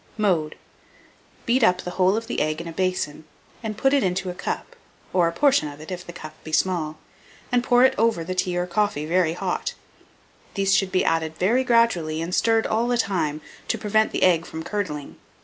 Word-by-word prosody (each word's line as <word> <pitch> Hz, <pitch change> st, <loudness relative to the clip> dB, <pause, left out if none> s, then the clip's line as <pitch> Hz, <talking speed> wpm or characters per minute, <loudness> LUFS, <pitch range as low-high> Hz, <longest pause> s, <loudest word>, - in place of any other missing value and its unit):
Mode. 175 Hz, -8 st, +1 dB, 0.9 s
Beat 250 Hz, +2 st, +2 dB
up 180 Hz, -3 st, +3 dB
the 180 Hz, -, -5 dB
whole 185 Hz, +3 st, +2 dB
of 230 Hz, -, -3 dB
the -, -, -2 dB
egg 155 Hz, +1 st, -1 dB
in 170 Hz, -, -6 dB
a -, -, -5 dB
basin, 185 Hz, -4 st, -2 dB, 0.5 s
put 270 Hz, +4 st, +2 dB
it 280 Hz, -, +4 dB
into 185 Hz, 0 st, -1 dB
a -, -, -7 dB
cup -, -, -5 dB, 0.4 s
(or 175 Hz, -2 st, +4 dB
a -, -, 0 dB
portion 275 Hz, -, +3 dB
of 145 Hz, 0 st, -9 dB
it, 155 Hz, +4 st, -9 dB
if 180 Hz, 0 st, -5 dB
the -, -, -6 dB
cup 155 Hz, -2 st, -9 dB
be 160 Hz, -, -8 dB
small), 155 Hz, -2 st, 0 dB, 0.5 s
and 245 Hz, -1 st, +2 dB
pour 245 Hz, +1 st, +5 dB
over 225 Hz, -6 st, +2 dB
it -, -, -6 dB
the 185 Hz, -, -3 dB
tea 180 Hz, -1 st, -1 dB
or 175 Hz, -, 0 dB
coffee 180 Hz, -3 st, 0 dB
very 170 Hz, 0 st, +2 dB
hot. 175 Hz, -, -3 dB, 0.8 s
These 195 Hz, -1 st, +2 dB
should 195 Hz, -1 st, +2 dB
be 185 Hz, -, +2 dB
added 160 Hz, -1 st, 0 dB
very 230 Hz, +8 st, +2 dB
gradually, 230 Hz, -11 st, +2 dB
and 165 Hz, +2 st, -4 dB
stirred 225 Hz, +2 st, +3 dB
all 225 Hz, +2 st, +1 dB
the 245 Hz, 0 st, +1 dB
time, 170 Hz, -9 st, -1 dB, 0.3 s
to -, -, 0 dB
prevent 215 Hz, +1 st, +1 dB
the -, -, -1 dB
egg 170 Hz, -3 st, +3 dB
from 160 Hz, 0 st, -6 dB
curdling. 160 Hz, -8 st, -4 dB
185 Hz, 205 wpm, -24 LUFS, 165-215 Hz, 0.9 s, pour